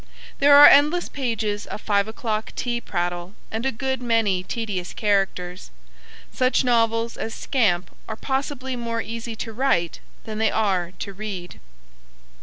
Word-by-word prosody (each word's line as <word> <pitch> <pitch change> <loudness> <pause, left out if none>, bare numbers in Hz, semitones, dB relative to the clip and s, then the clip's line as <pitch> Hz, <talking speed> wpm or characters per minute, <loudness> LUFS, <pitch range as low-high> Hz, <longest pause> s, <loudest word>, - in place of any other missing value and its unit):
There 285 0 +7
are 290 - +11
endless 300 +5 +6
pages 225 -6 -2
of - - -6
five 200 -1 +1
o'clock 220 -1 -3
tea 240 -1 -2
prattle 175 0 -3 0.2
and 225 +4 -2
a - - +1
good 265 +2 -3
many 225 -6 +1
tedious 190 -3 -4
characters. 195 -3 -1 0.6
Such 255 +1 +2
novels 230 -1 +1
as 225 - -4
Scamp 190 -10 0
are 220 - -3
possibly 265 +1 -3
more 230 -1 -3
easy 230 0 -6
to 225 +1 -6
write 215 -9 0 0.2
than 215 -1 -6
they 220 - +3
are 190 -5 0
to 200 - -6
read. 190 -3 -7
225 Hz, 145 wpm, -23 LUFS, 200-245 Hz, 0.6 s, are